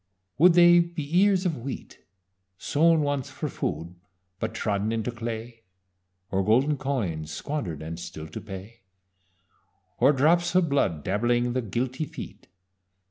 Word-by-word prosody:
Would 175 +2 +7
they 175 0 +7
be 170 -1 0
ears 195 -1 +3
of 165 -5 0
wheat 130 +3 -7 0.6
Sown 160 - +3
once 145 -3 -1
for - - -4
food 85 +2 -4 0.5
but - - -3
trodden 105 0 -1
into 115 +1 -2
clay? 115 0 -6 0.7
Or 95 0 +1
golden 130 +9 +3
coins 95 - -2
squander'd 85 - -4
and 80 +2 -6
still 80 -2 -7
to - - -7
pay? 105 +3 -10 1.2
Or 140 - +6
drops 170 +6 +2
of 180 -3 +4
blood 95 - +1
dabbling 120 +4 +1
the 130 - 0
guilty 125 - -2
feet? - - -10
125 Hz, 135 wpm, -26 LUFS, 100-155 Hz, 1.2 s, Would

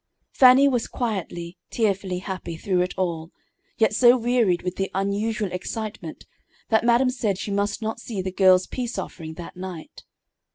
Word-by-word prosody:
Fannie 260 +2 +7
was 245 -4 0
quietly, 185 -6 -4
tearfully 195 -4 -1
happy 185 -3 -6
through 185 +1 0
it 180 - -2
all, 165 -3 -2 0.5
yet 220 -2 +3
so 245 +3 +6
wearied 235 -7 +1
with 180 0 -3
the 195 0 -1
unusual 200 +1 -1
excitement 185 -2 -6 0.4
that 220 -1 +3
madam 240 +2 +3
said 215 -7 -1
she 205 - -5
must 205 +2 -1
not 220 +1 -3
see 225 -4 -6
the 185 0 -3
girl's 185 -1 +5
"peace 245 -2 -4
offering" 160 -2 -6
that 170 +1 -9
night. 180 -3 -8
200 Hz, 160 wpm, -24 LUFS, 180-230 Hz, 0.5 s, Fannie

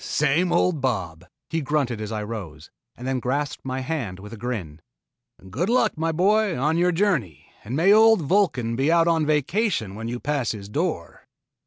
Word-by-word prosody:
"Same 155 +5 +1
old 170 -6 +2
Bob," 90 -10 -2 0.3
he 165 0 0
grunted 135 -6 -1
as 105 0 -5
I 105 -1 -3
rose, 95 -8 -8 0.3
and 125 - -7
then 130 0 0
he - - -4
grasped 140 +3 -2
my 130 0 -3
hand 130 - -3
with 105 +3 -11
a - - -5
grin. 105 -10 -5 0.7
"Good 140 - -2
luck, 250 +2 +2
my 165 +1 -1
boy, 200 +3 +2
on 150 +6 +1
your 180 +1 +3
journey, 165 - -1
and 115 +5 -5
may 180 +7 +5
old 220 -4 +6
Vulcan 135 - +1
be 135 +6 +1
out 170 0 +4
on 165 -2 +2
a - - -5
vacation 155 - 0
when 110 +2 -6
you 120 +1 -4
pass 140 -5 -1
his 100 -2 -9
door." 150 - -3
135 Hz, 195 wpm, -24 LUFS, 110-165 Hz, 0.7 s, old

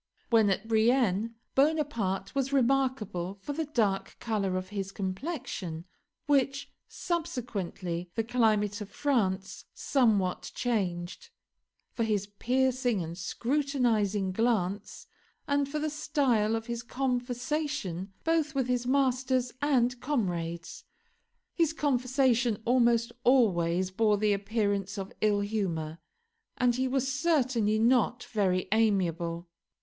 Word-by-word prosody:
When 220 -3 +5
at 195 +3 -1
Brienne, 225 -1 +2 0.2
Bonaparte 270 -11 +1
was 275 -1 -1
remarkable 250 -9 +1
for 290 +9 -5
the 320 +2 -2
dark 210 -9 0
color 200 -5 -1
of 185 0 -5
his 195 -2 -4
complexion 190 - -4 0.4
(which, 275 -1 +1 0.2
subsequently, 200 - -3
the 225 - +1
climate 215 -3 +1
of 205 - -6
France 200 -7 -1
somewhat 210 -9 +1
changed), 195 - -2 0.6
for 230 - -1
his 210 -3 0
piercing 245 0 0
and 165 +1 -6
scrutinising 230 - 0
glance, 205 -2 -1 0.4
and 285 -1 +1
for 305 - -3
the 305 0 -1
style 270 -8 +1
of 225 0 -3
his 235 0 -4
conversation 250 - -2
both 320 -2 +1
with 265 -2 +1
his 245 -1 -1
masters 255 -2 +1
and 250 -4 +2
comrades. 175 - -2 0.7
His 330 -2 +2
conversation 255 -5 +1
almost 235 -1 +3
always 185 -8 +3
bore 210 +1 +2
the 210 0 +2
appearance 200 -1 -1
of 195 -1 -5
ill 210 -1 +3
humour, 170 -7 -2 0.6
and 245 -1 +3
he 260 +2 0
was 265 0 0
certainly 265 -7 +1
not 240 +1 +2
very 185 -4 0
amiable. 175 -6 +1
230 Hz, 115 wpm, -29 LUFS, 195-265 Hz, 0.7 s, When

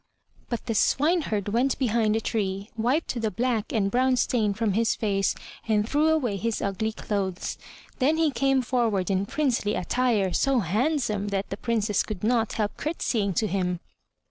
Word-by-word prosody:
But 235 - -3
the 225 - -1
swineherd 270 - +1
went 245 +5 +1
behind 225 -4 +1
a 225 - 0
tree, 200 -2 -2
wiped 245 +2 0
the 220 - +1
black 230 -1 -1
and 200 -4 +1
brown 255 +2 +3
stain 225 -4 +1
from 215 -2 0
his 225 +2 +2
face, 200 -3 0 0.3
and 210 -1 +2
threw 295 +5 +2
away 270 -10 +1
his 230 +2 -1
ugly 200 +2 -1
clothes. 200 -4 -3 0.4
Then 295 +4 +3
he 320 -2 +2
came 270 +1 +2
forward 225 -7 0
in 195 +1 0
princely 255 -7 0
attire, 210 -1 +1
so 270 -3 +2
handsome 215 - 0
that 200 -1 -2
the - - -1
Princess 215 -3 0
could 210 -4 -6
not 225 -1 +1
help 210 -2 -2
curtseying 225 - -1
to 220 - +2
him. 180 -3 -1
220 Hz, 170 wpm, -26 LUFS, 200-255 Hz, 0.4 s, brown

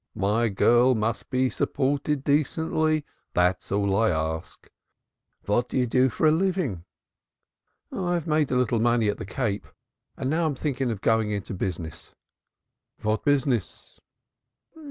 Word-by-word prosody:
My 110 +4 +1
girl 120 +5 +4
must 110 +1 -2
be 130 0 +2
supported 140 +1 -1
decently 155 +1 +1 0.3
that 90 +1 +2
is - - -12
all 100 -1 +1
I 110 +2 +3
ask. 80 -1 -3 0.8
What 120 +4 +1
do - - -2
you 125 - +3
do 125 +2 +3
for 125 - -1
a 155 - +6
living?" 160 - 0 1.1
"I 175 -2 -1
have 170 -3 -2
made 155 -3 +1
a 125 - +1
little 120 -2 +1
money 120 -1 +2
at 105 - -2
the - - -6
Cape 105 -1 -2 0.5
and 130 - -3
now 160 +3 +1
I - - -2
think 140 -1 -3
of 115 -6 -1
going 110 -1 +2
into 100 -2 -4
business." 90 -4 -5 0.9
"What 110 +1 0
business?" 135 - -1
120 Hz, 150 wpm, -25 LUFS, 105-145 Hz, 1.1 s, a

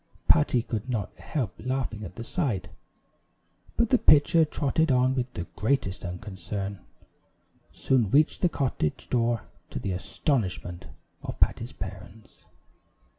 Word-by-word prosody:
Patty 120 - +4
could 115 +1 -4
not 110 -6 -2
help 125 - -2
laughing 130 -4 -2
at 90 -3 -8
the 115 - -6
sight, 125 - -1 1.1
but 235 -2 +3
the 255 - +4
pitcher, 155 +2 +6
trotting 155 0 +1
on 130 0 +4
with 125 -1 -2
the 85 - -2
greatest 105 -5 0
unconcern, 95 +2 -5 0.9
soon 125 -6 +1
reached 150 +7 +3
the 180 - +4
cottage 125 - -2
door 120 -2 +2 0.3
to - - -6
the 100 - -2
astonishment 90 - -2 0.4
of - - -6
Patty's - - +2
parents. 100 +5 -10
120 Hz, 125 wpm, -27 LUFS, 95-135 Hz, 1.1 s, pitcher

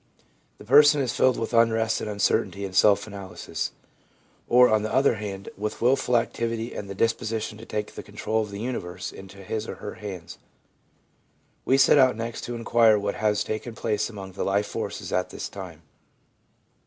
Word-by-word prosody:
The - - -13
person 145 +4 +7
is 130 -3 0
filled 130 -2 +3
with 115 - -3
unrest 115 -1 +3
and 110 - -4
uncertainty 100 -1 0
and 95 -1 -7
self 100 +1 +5
analysis; 100 -3 -5 0.8
or, 125 +1 +7
on 110 -2 +2
the 110 - -3
other 130 -3 +3
hand, 100 -2 -6
with 105 +1 -4
wilful 125 0 +3
activity 115 0 -2
and 100 - -6
the 100 - -6
disposition 115 0 -1
to 115 - -11
take 105 -1 -4
the - - -7
control 110 0 -2
of 105 - -4
the 100 0 -7
universe 90 -7 -4
into 95 0 -12
his 110 +3 -4
or - - -5
her 105 - -7
hands. 95 -5 -8 1.3
We 135 - +4
set 135 +1 +6
out 130 -3 +5
next 115 +1 -5
to 120 - -5
inquire 115 -1 +4
what 100 0 -2
has 105 -1 +1
taken 110 +2 -5
place 105 -1 -1
among 100 -4 -8
the 95 - -4
life 100 +1 +1
forces - - -5
at - - 0
this - - -5
time. 90 -5 -9
110 Hz, 180 wpm, -25 LUFS, 100-115 Hz, 1.3 s, person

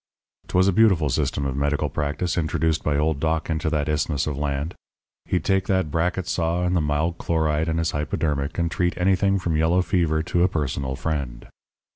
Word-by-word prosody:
"'Twas 95 +1 +3
a 100 - +3
beautiful 95 -9 +4
system 70 +1 -1
of 65 -1 -2
medical 70 0 0
practice 75 +4 -2
introduced 80 -1 0
by 75 -1 +1
old 75 -1 +1
Doc 80 +1 -1
into 80 0 -1
that 75 -2 -1
isthmus 75 -1 0
of 75 - -2
land. 70 +3 -2 0.5
He'd - - -1
take 95 -1 +1
that 95 -6 +1
bracket 90 +3 -1
saw 85 +1 0
and 90 +1 +1
the 85 - +2
mild 75 +3 -1
chloride 80 -1 0
and 80 - 0
his 80 0 0
hypodermic, 75 -1 -2
and 85 -1 0
treat 90 -1 0
anything 95 +2 +2
from 85 -3 -1
yellow 85 +3 +3
fever 80 -2 +1
to 85 +2 0
a 90 - +5
personal 70 -6 -2
friend. 70 -6 -4
80 Hz, 190 wpm, -23 LUFS, 75-90 Hz, 0.5 s, a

